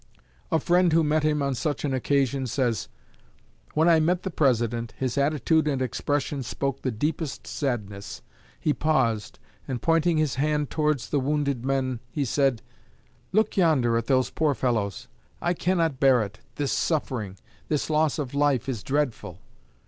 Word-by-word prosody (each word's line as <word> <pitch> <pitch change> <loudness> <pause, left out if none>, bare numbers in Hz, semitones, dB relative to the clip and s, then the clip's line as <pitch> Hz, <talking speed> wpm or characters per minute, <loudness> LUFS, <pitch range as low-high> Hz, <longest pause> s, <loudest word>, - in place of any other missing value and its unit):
A 160 - +4
friend 175 +2 +3
who 165 0 +4
met 155 +1 +2
him 150 -1 +1
on 140 -1 0
such 145 +4 -2
an 140 - -1
occasion, 135 0 +1
says: 120 -4 -1 0.9
"When 160 +2 +4
I 165 -2 +6
met 175 +3 +1
the 190 - -3
President, 120 -6 0
his 130 -2 -2
attitude 150 +2 +2
and 140 -3 0
expression 140 +3 -1
spoke 135 +2 -3
the 130 - -1
deepest 150 +6 -3
sadness. 105 -8 -4 0.4
He 150 - +1
paused, 130 -10 0 0.3
and, 130 -3 -3
pointing 165 +2 +2
his 150 -5 0
hand 150 -1 0
towards 150 -5 0
the 145 - +2
wounded 140 -2 -1
men, 130 -2 -1
he 140 +4 -2
said: 135 -3 +1 0.7
'Look 215 +2 +2
yonder 150 -11 +3
at 115 0 -1
those 130 -2 +2
poor 150 -3 +1
fellows. 110 -7 -1 0.3
I 175 - 0
cannot 170 -6 0
bear 130 -4 +5
it! 105 +2 -8 0.2
This 145 -2 -1
suffering, 120 - -1 0.3
this 150 -2 0
loss 155 -1 +1
of 140 -4 -4
life, 140 -4 +1
is 120 -6 -3
dreadful!' 130 - -2
140 Hz, 160 wpm, -26 LUFS, 125-155 Hz, 0.9 s, I